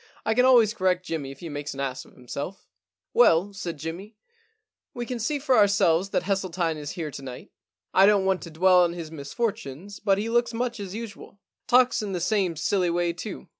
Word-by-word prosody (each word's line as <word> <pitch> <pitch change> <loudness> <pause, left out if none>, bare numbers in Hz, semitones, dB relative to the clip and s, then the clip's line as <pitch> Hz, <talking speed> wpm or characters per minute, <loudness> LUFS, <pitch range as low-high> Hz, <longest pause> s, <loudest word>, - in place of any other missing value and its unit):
* - - -28
I 220 - +2
can 250 +2 +4
always 235 -5 +5
correct 185 -4 0
Jimmy 155 -6 -4
if 135 - -11
he 170 - -6
makes 145 -1 -5
an - - -8
ass 130 -2 -3
of - - -19
himself/ 140 +9 -7 0.2
* - - -66
Well,' 200 - +4
said 180 -5 -5
Jimmy, 170 +8 -7 0.4
* 435 0 -57
we 240 -1 -3
can 245 0 -4
see 290 +7 -1
for 275 -1 +1
our 210 -3 +6
selves 195 -2 +2
that - - 0
Hesseltine 180 -4 -1
is 145 -1 -6
here 160 -4 -5
to 140 - -8
night. 130 -2 -9 0.4
I 195 +1 +6
don't 205 -2 +4
want 190 -1 +1
to 170 - -8
dwell 180 +3 +4
on 170 -1 +2
his 165 -3 -7
misfortunes, 165 - -4
but 195 -2 +2
he 210 +3 -2
looks 240 0 +1
much 240 -1 -2
as 195 -1 -6
usual. 215 -3 -9 0.3
Talks 250 -1 +4
in 205 -2 -4
the 180 - -1
same 180 -1 0
silly 180 +3 +1
way 170 0 0
too. 185 +4 -7
190 Hz, 225 wpm, -25 LUFS, 165-215 Hz, 0.4 s, our